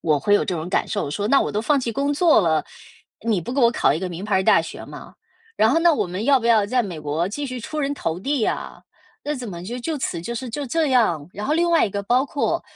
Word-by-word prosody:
我 155 -3 +2
会 205 +8 +2
有 - - +3
这 - - -3
种 160 +2 -5
感 185 - 0
受 205 -8 -2
说： 205 +6 -2
“那 275 - +5
我 - - -2
都 210 - 0
放 285 +4 +2
弃 235 -2 -3
工 280 +4 0
作 325 -4 +5
了， 160 -4 +1 0.6
你 215 -5 +2
不 170 - -7
给 270 - -2
我 235 -2 +5
考 140 - +2
一 - - -2
个 185 +1 -3
名 175 +1 -7
牌 210 -1 -1
儿 190 - +1
大 - - +5
学 - - -8
吗？ - - -11 0.4
然 220 - +4
后 305 - +3
那 335 -1 +5
我 275 - -1
们 185 +3 -5
要 275 +1 +5
不 - - -9
要 220 -3 +4
在 250 +3 +1
美 180 -7 -6
国 150 +3 -1
继 285 +7 -4
续 255 -1 -5
出 305 +6 -4
人 280 0 -1
头 165 - -3
地 280 +5 -1
呀？ 215 - -3 0.4
那 295 - -1
怎 250 -4 -6
么 170 -2 -7
就 240 +6 -5
就 310 +6 -3
此 175 -10 -3
就 235 +8 -5
是 245 +1 -5
就 285 +4 -4
这 315 +4 0
样？” 215 - +2
然 205 +2 -5
后 300 - +1
另 340 +1 +2
外 335 -7 +4
一 - - -6
个 200 +1 -3
包 250 +6 +2
括 285 - -1
230 Hz, 310 characters per minute, -22 LUFS, 185-280 Hz, 0.6 s, 那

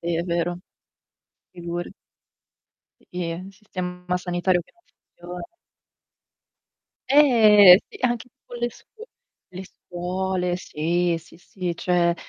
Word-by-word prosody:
Sì, 170 -1 -2
è 170 - -1
vero. 175 0 -2 0.9
Figure 175 0 -6 1.3
I 180 - -2
e, - - -3
un 185 +3 -9
sistema 180 -3 -5
sanitario 180 0 0
che - - -18
non 345 - -33
funziona 180 - -11 1.6
Eh! 215 -9 +7
Sì, - - -12
anche 240 0 -1
tipo 245 - -25
le 240 - 0
scuo 445 - -15 0.5
le 185 +1 -8
scuole, 180 0 -3
sì, 170 +1 -1
sì, 165 0 -18
sì. 180 -1 -5
Cioè 175 0 +1
180 Hz, 115 wpm, -23 LUFS, 175-195 Hz, 1.6 s, Eh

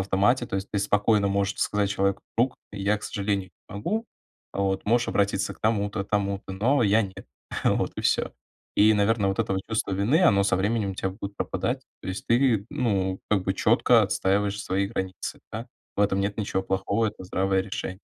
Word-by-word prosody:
автомате, 105 +7 +2
то 95 - -3
есть 95 +1 -4
ты 105 - +1
спокойно 105 0 +2
можешь 100 +1 0
сказать 105 -1 +1
человеку: 100 -1 0
"Друг, 120 +3 +2 0.2
я, 100 +1 +1
к - - -21
сожалению, 100 -2 -2 0.2
не 105 - -10
могу. 220 - -2 0.5
Вот, 95 -1 -1
можешь 120 +2 +2
обратиться 100 -1 0
к - - -25
тому-то, 105 -2 0
тому-то, 100 -1 -2
но 120 +8 +2
я- 110 +1 +4
нет". 95 -2 -8 0.4
Вот - - +2
и - - -2
всё. - - +1 0.4
И, 110 +1 +6
наверное, 105 0 +2
вот 95 - -2
это 95 - 0
чувство 110 -3 -1
вины- 110 - +2
оно 100 - +5
со 100 -2 +2
временем 105 +1 0
у - - -9
тя 95 0 -2
будет 100 +1 -7
пропадать. - - -2 0.2
То - - -6
есть 95 +1 -5
ты, 115 -4 +3
ну, 100 -10 0
как 105 -3 +3
бы 95 - 0
четко - - +4
отстаиваешь 100 +1 0
свои 100 +1 0
границы, 95 -3 -4
да. - - -5 0.3
В - - 0
этом 100 -1 +2
нет 100 +1 -1
ничего 95 -2 -1
плохого, 100 +4 0
это 105 -3 -6
здравое 95 +1 +1
решение. 95 -1 -5
100 Hz, 190 wpm, -26 LUFS, 95-110 Hz, 0.5 s, И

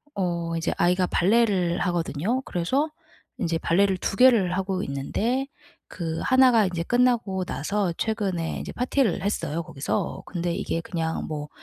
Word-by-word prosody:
어 170 -3 -1
이제 165 - -1
아이가 180 +1 +3
발레를 190 -3 +2
하거든요. 175 - -1
그래서 260 - 0 0.5
인제 170 -4 0
발레를 190 +3 +2
2 195 - -3
개를 230 -9 +5
하고 190 0 -1
있는데 225 - -1 0.4
그 165 -2 -4
하나가 255 -5 +5
이제 170 -2 -3
끝나고 240 -5 +1
나서 190 +4 -1
최근에 195 -7 -2
이제 - - -6
파티를 250 -4 +1
했어요, 165 -5 -2
거기서. 135 -2 -3
근데 175 -1 -2
이게 165 - -2
그냥 165 -2 -3
뭐 150 -2 -5
185 Hz, 310 characters per minute, -25 LUFS, 170-220 Hz, 0.5 s, 개를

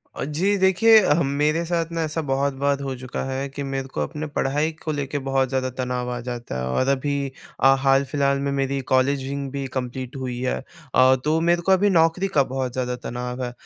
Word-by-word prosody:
अ, - - -3
जी 180 +8 +1
देखिए 190 +4 +6
ह 155 +3 +3 0.2
मेरे 155 +3 +2
साथ 170 -1 -1
ना 165 0 -2
ऐसा 155 +1 -2
बहुत 140 +1 +1
बार 140 0 +2
हो 135 -1 -3
चुका 125 0 -5
है 135 +1 -3
कि 140 +1 -6
मेरे 135 -1 -3
को - - -4
अपने 155 0 -4
पढ़ाई 145 +2 0
को 155 - -2
लेके 145 -1 -2
बहुत 135 -1 +1
ज़्यादा 130 -1 -1
तनाव 125 -1 -2
आ 120 - -3
जाता 120 - -6
है। 65 - -2
और 65 - 0
अभी 140 +1 0 0.3
अ, 135 0 +6
हाल-फिलहाल 140 +1 +2
में 140 0 -1
मेरी 135 0 -1
कॉलेजिंग 135 +1 +1
भी 140 0 -3
कम्प्लीट 130 0 -4
हुई 130 -2 -4
है। 125 0 -1 0.4
अ, 130 +1 +6
तो 155 +2 +2
मेरे 170 +1 +2
को 190 - +1
अभी 195 +2 +4
नौकरी 165 +1 +3
का 150 -8 +3
बहुत 130 -1 -3
ज़्यादा 125 -1 -2
तनाव 125 +1 -5
है। 120 - -3
140 Hz, 210 wpm, -23 LUFS, 130-155 Hz, 0.4 s, देखिए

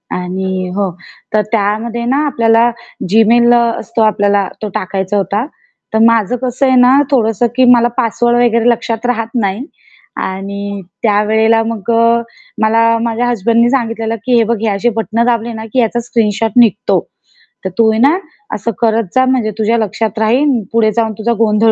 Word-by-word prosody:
आणि 185 +1 -3
हो 200 -2 0 0.4
तर 215 - +3
त्यामध्ये 225 +2 -1
ना 265 +3 0
आपल्याला 230 -3 +2 0.4
जीमेल 235 +3 +4
असतो 235 -1 0
आपल्याला, 205 -2 +1
तो 215 - -3
टाकायचा 190 +1 -2
होता. 200 +4 -1 0.5
तर 220 - +2
माझं 230 0 +2
कसं 255 +1 -1
आहे 260 -1 +3
ना 250 +2 +5
थोडंसं, 230 -3 +1
की 260 - +4
मला 240 0 +3
पासवर्ड 240 +1 +1
वगैरे 235 0 +2
लक्षात 230 0 -2
राहत 230 -2 -1
नाही 200 +6 -2 0.6
आणि 200 +1 -5 0.2
त्यावेळेला 220 +1 +2
मग 225 -1 -3
अ, 230 0 +3 0.4
मला 230 +1 +3
माझ्या 235 +1 -1
हसबँडनी 235 +1 +2
सांगितलेलं, 230 -3 -2
की 250 -1 +2
"हे 230 - +4
बघ 230 +1 -1
हे 225 - -1
असे 230 +5 0
बटन 225 +1 0
दाबले 235 -1 -1
ना 220 0 -7
की 260 - +1
याचा 240 0 +1
स्क्रीनशॉट 225 -2 -1
निघतो. 215 -4 +3 0.7
तर - - -1
तू 225 -1 +4
आहे 220 - -1
ना 285 +8 +4 0.4
असं 210 +3 -3
करत 230 0 +2
जा 260 - +4
म्हणजे 255 -4 0
तुझ्या 225 +1 +1
लक्षात 220 0 -2
राहील 245 +7 +2 0.2
पुढे 220 -1 +2
जाऊन 225 -2 0
तुझा 235 +2 0
गोंधळ 220 0 +3
225 Hz, 165 wpm, -14 LUFS, 215-235 Hz, 0.7 s, ना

